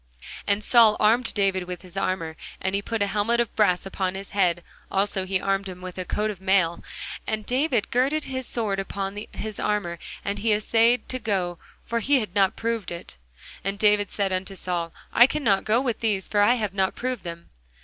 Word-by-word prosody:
And 200 +1 +1
Saul 225 -2 +6
armed 225 +3 +3
David 195 -3 +1
with 180 0 -6
his 180 -1 -12
armour, 170 -4 -1 0.2
and 190 0 -1
he 200 - +1
put 225 0 -1
a - - +2
helmet 210 +4 +1
of 235 -3 -1
brass 190 -5 +3
upon 190 -1 -2
his 195 +1 -7
head; 180 -4 +2 0.3
also 195 -1 0
he 190 0 +1
armed 195 0 -1
him 180 -1 -8
with 185 0 -7
a 185 - -3
coat 215 +3 -1
of 190 -3 -10
mail. 190 -3 +2 0.4
And 215 -1 -2
David 255 -2 +1
girded 275 +5 +2
his 260 -1 -3
sword 210 -5 -1
upon 195 0 -3 0.2
his 215 -1 -4
armour, 200 -5 -1 0.3
and 200 +1 -2
he 215 +1 +2
assayed 225 +3 +3
to 255 - -2
go; 185 -6 -1 0.3
for 235 - -1
he 275 +4 +3
had 210 -6 -5
not 195 -2 +3
proved 230 -4 -2
it. 170 - -7 0.5
And 195 +1 -2
David 205 -1 +3
said 195 -2 -1
unto 190 +1 -3
Saul, 175 -3 -2 0.2
I 240 - +8
cannot 225 -10 +1
go 220 +2 +3
with 250 -4 -1
these; 205 -4 0
for 205 - +2
I 235 +4 +5
have 210 -5 -2
not 190 -1 0
proved 250 -5 -3
them. 170 0 -8
200 Hz, 205 wpm, -25 LUFS, 190-225 Hz, 0.5 s, I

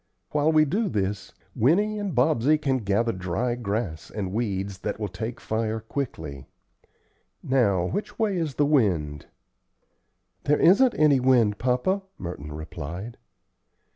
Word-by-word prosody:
While 150 +1 +2
we 155 -1 +5
do 205 +8 0
this, 100 - -2 0.2
Winnie 205 - +2
and 200 -7 -3
Bobsey 135 +2 +3
can 135 -3 0
gather 110 +2 +1
dry 95 +6 -2
grass 105 -8 -3
and 95 -3 -4
weeds 100 -4 -2
that 105 +2 -4
will 105 - -2
take 110 +6 -5
fire 110 0 -2
quickly. 80 - -5 1.0
Now 100 -9 +2
which 200 - -4
way 215 -4 +1
is 160 -6 -2
the 145 - +3
wind?" 90 - +1 1.2
"There 150 +1 +3
isn't 235 +8 +5
any 150 -3 +4
wind, 120 -5 +3
papa," 130 - +1 0.2
Merton 80 -4 -7
replied. 80 +7 -7
115 Hz, 135 wpm, -25 LUFS, 95-150 Hz, 1.2 s, we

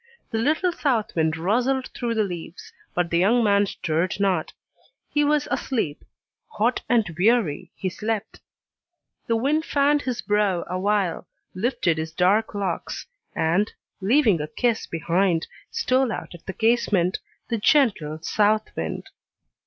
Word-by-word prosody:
The 225 - -1
little 310 +9 +2
south 255 -10 -1
wind 160 -1 +1
rustled 245 +9 0
through 235 -2 -3
the 220 - +2
leaves, 175 -3 -7 0.2
but 175 -1 0
the 170 - +3
young 230 +6 +4
man 200 -1 +3
stirred 170 +2 -1
not; 190 -5 +1 0.6
he 295 - +2
was 295 0 +2
asleep; 220 - -2 0.5
hot 235 +4 +1
and 235 -4 +4
weary, 185 -6 +2
he 190 - -3
slept. 215 +3 -3 0.9
The 230 - +2
wind 285 +7 +1
fanned 290 -1 +2
his 250 -3 -3
brow 205 -4 +1
awhile, 185 -1 0 0.3
lifted 185 -5 0
his 160 0 -4
dark 200 +6 +2
locks, 195 -4 -3 0.3
and, 175 +6 +1 0.3
leaving 210 - +3
a 150 - -3
kiss 235 +8 0
behind, 170 +1 +1 0.2
stole 255 -1 +1
out - - -6
at 175 - -14
the 190 - -3
casement, 210 -6 +2 0.3
the 230 -2 -1
gentle 205 - +2
south 215 +4 +2
wind! - - -4
210 Hz, 140 wpm, -24 LUFS, 175-240 Hz, 0.9 s, young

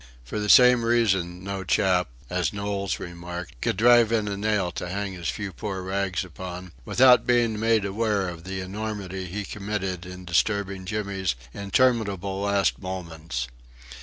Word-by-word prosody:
For - - -4
the 105 0 -2
same 125 0 +7
reason 95 -7 +1
no 95 0 -4
chap 90 -3 +2 0.2
as 90 +3 0
Knowles 100 -2 -2
remarked 85 -4 -7
could - - 0
"drive 120 0 +6
in 110 -2 +1
a 100 - -2
nail 100 -3 0
to 90 - -5
hang 100 +1 -3
his 85 -2 -4
few 100 -3 -4
poor 95 -3 -4
rags 95 -1 -1
upon," 90 0 -8
without 125 0 +5
being 120 -3 +2
made 110 -2 +2
aware 100 -1 0
of 85 -2 -7
the 95 +1 -4
enormity 95 -1 -5
he 100 +3 -4
committed 95 -4 -4
in 90 0 -9
disturbing 95 +2 0
Jimmy's 100 - -2 0.2
interminable 100 -3 +1
last 100 -1 +1
moments. 85 -9 -5
100 Hz, 155 wpm, -25 LUFS, 90-105 Hz, 0.2 s, same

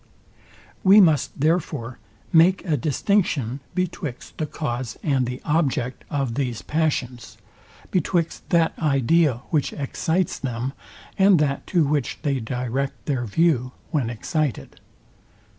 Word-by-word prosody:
We 195 +2 +8
must 155 -10 +3
therefore, 150 -6 -1 0.3
make 175 +4 +5
a 160 -4 +1
distinction 145 - 0 0.2
betwixt 170 -8 -4
the 155 - -1
cause 125 -5 -4
and 135 -5 +1
the 125 +1 -4
object 140 -6 0
of 135 -5 -1
these 125 -3 -2
passions; 130 -9 -2 0.5
betwixt 170 -1 -1
that 165 -2 +3
idea, 140 -2 +2
which 150 -4 +1
excites 160 +5 -1
them, 125 0 -3 0.5
and 195 -1 +6
that 140 -2 0
to 175 -3 +3
which 145 -3 -1
they 140 -3 0
direct 125 +3 -3
their 130 -5 -1
view, 125 +1 +1 0.2
when 140 -8 0
excited. 140 +4 -3
145 Hz, 120 wpm, -23 LUFS, 125-165 Hz, 0.5 s, We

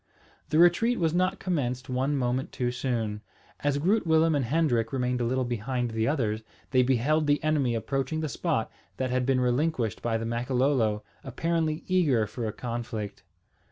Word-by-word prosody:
The 155 - +1
retreat 175 +8 +4
was 165 -2 +1
not 185 +2 +1
commenced 130 -9 -2
one 135 +3 0
moment 125 0 -1
too 125 -1 -1
soon. 115 -5 -2 0.4
As 145 -1 0
Groot 185 +6 +1
Willem 160 0 +4
and 140 -4 +1
Hendrik 120 -5 +1
remained 125 -2 -1
a - - +1
little 130 +2 0
behind 120 +1 -2
the 110 0 0
others, 115 -7 0 0.3
they 130 -2 +5
beheld 135 +5 +2
the 145 +2 +2
enemy 145 -6 +1
approaching 135 +6 -2
the 155 - -1
spot 150 -6 -1 0.3
that 130 -1 -1
had 125 0 0
been 135 -1 +3
relinquished 125 - 0
by 115 -1 0
the 115 - -4
Makololo, 120 -2 +1 0.2
apparently 160 +3 -1
eager 150 - +2
for 110 +2 -4
a - - -2
conflict. 115 -2 -5
130 Hz, 170 wpm, -27 LUFS, 120-155 Hz, 0.4 s, they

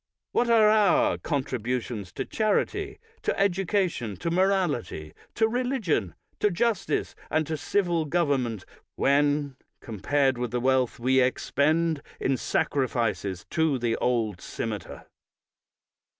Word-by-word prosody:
What 240 - +1
are 225 -2 +6
our 255 +9 +4
contributions 125 - -3
to - - -3
charity, 390 - -1 0.2
to - - -1
education, 185 - 0
to 165 - -3
morality, 170 - 0 0.2
to 220 - +3
religion, 225 - -1 0.2
to 210 - +3
justice, 205 +2 0 0.2
and 155 0 +1
to 160 - -3
civil 170 +2 0
government, 140 - 0 0.3
when 145 -1 +2 0.2
compared 130 +4 0
with 125 -1 -2
the 125 +2 -1
wealth 130 -1 +1
we 130 +2 +3
expend 155 +4 +1 0.2
in 135 - +1
sacrifices 115 -8 -1
to 160 -4 +2
the 120 -2 0
old 110 -6 0
cimeter? - - -6
145 Hz, 115 wpm, -26 LUFS, 125-190 Hz, 0.3 s, are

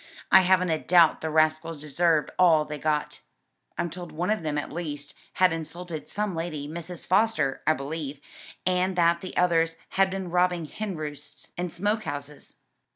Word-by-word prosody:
I 190 - +9
haven't 185 -1 +3
a 160 - +1
doubt 170 -2 +4
the 160 - -2
rascals 155 0 +1
deserved 155 +1 +1
all 165 -4 +5
they 150 -1 -6
got. 150 -1 -1 0.6
I'm 170 - -2
told 175 -1 -7
one 175 +6 -1
of 215 - 0
them 155 -2 -2
at 145 - -3
least, 145 -4 -5 0.2
had 185 -2 +4
insulted 165 0 -6
some 210 -1 -2
lady, 165 -3 -4
Mrs. 170 +2 -7
Foster, 190 -8 +2
I 155 - +6
believe, 145 0 -5 0.5
and 185 +1 +1
that 170 -1 +3
the 185 - -7
others 165 -2 +3
had 195 0 +2
been 190 -2 -4
robbing 180 -1 +2
hen 200 +4 -5
roosts 150 -1 -7
and 175 -1 -3
smoke 205 +5 -1
houses." 145 0 -6
165 Hz, 170 wpm, -26 LUFS, 155-180 Hz, 0.6 s, I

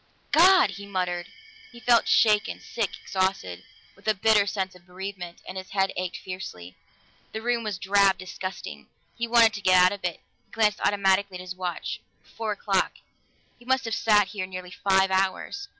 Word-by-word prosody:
"God!" 355 - +6
he 200 +1 -9
muttered. 180 -3 -2 0.4
He 240 - -13
felt 240 -1 +3
shaken, 210 -2 +3
sick, 225 -5 -3
exhausted, 185 - -2 0.3
with 200 - -17
a 215 - +3
bitter 205 +1 +3
sense 190 -2 -2
of 180 0 -19
bereavement, 180 -1 -8
and 185 +1 -5
his 185 - -10
head 195 -1 0
ached 185 0 -3
fiercely. 90 - -8 0.6
The 220 - -4
room 240 -1 0
was 210 -4 -3
drab, 195 +1 +3
disgusting; 175 - -7 0.3
he 235 - -3
wanted 230 -2 +5
to 205 - -6
get 185 -1 +4
out 180 0 +6
of 200 -1 -7
it. 175 -2 -3 0.2
He - - -39
glanced 215 -2 +2
automatically 200 -1 +2
at - - -9
his 185 0 -6
watch: 180 -1 -4 0.2
four 225 -1 -5
o'clock 200 -2 0 0.7
he 240 - -18
must 260 -1 +1
have 225 - -3
sat 210 -3 +3
here 190 -3 -4
nearly 185 -1 -8
five 190 0 +2
hours. 195 - -1
195 Hz, 180 wpm, -26 LUFS, 185-215 Hz, 0.7 s, God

